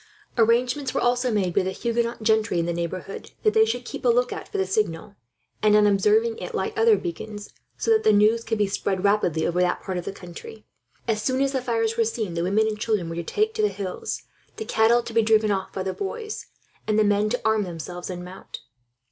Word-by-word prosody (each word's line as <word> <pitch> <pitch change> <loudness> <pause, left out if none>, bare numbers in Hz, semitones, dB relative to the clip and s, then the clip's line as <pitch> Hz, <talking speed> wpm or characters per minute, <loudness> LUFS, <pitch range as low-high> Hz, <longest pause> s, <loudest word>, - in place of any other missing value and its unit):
Arrangements 245 +4 +2
were - - +2
also 245 +1 +2
made, 190 -5 0
with 195 - +2
the 190 - -1
Huguenot 235 +2 -2
gentry 220 -3 +2
in 170 - +1
the 170 - -1
neighbourhood, 170 +3 -5
that 430 - +3
they 440 0 +5
should 245 - -3
keep - - -7
a 250 - +3
lookout 245 +1 +1
for - - -5
the 190 - +1
signal; 190 -1 -2 0.5
and 210 -1 +5
on 210 0 +6
observing 210 +3 +3
it - - -6
light 435 - -2
other 445 0 +5
beacons, 215 - -6 0.3
so 455 - 0
that 440 0 +4
the - - +5
news 215 +2 +4
could 225 -1 -2
be 210 - +3
spread 195 -1 -2
rapidly 200 -6 +2
over 175 +1 +1
that 180 0 0
part 185 -2 -3
of 175 - -8
the - - -3
country. 195 - -11 0.4
As 215 -2 0
soon 260 +4 0
as 275 0 +2
the 265 -2 -1
fires 225 -2 0
were 230 - +4
seen, 220 -4 -3
the 170 - -2
women 200 +5 +2
and 215 -1 -2
children 210 -7 -1
were 165 - -5
to 170 - -2
take 430 - 0
to 440 - -1
the 420 - +4
hills, 195 - -5 0.3
the 440 - -5
cattle 235 - +3
to 230 - -8
be 230 - +4
driven 215 -1 +3
off 190 -1 -2
by 190 - -4
the 190 0 -2
boys, 430 +2 -5 0.4
and 215 -1 +2
the 215 - +5
men 205 0 +2
to 245 - -1
arm 220 -1 +3
themselves 175 -1 -6
and 180 -1 -6
mount. 185 +1 -10
215 Hz, 235 wpm, -24 LUFS, 190-240 Hz, 0.5 s, on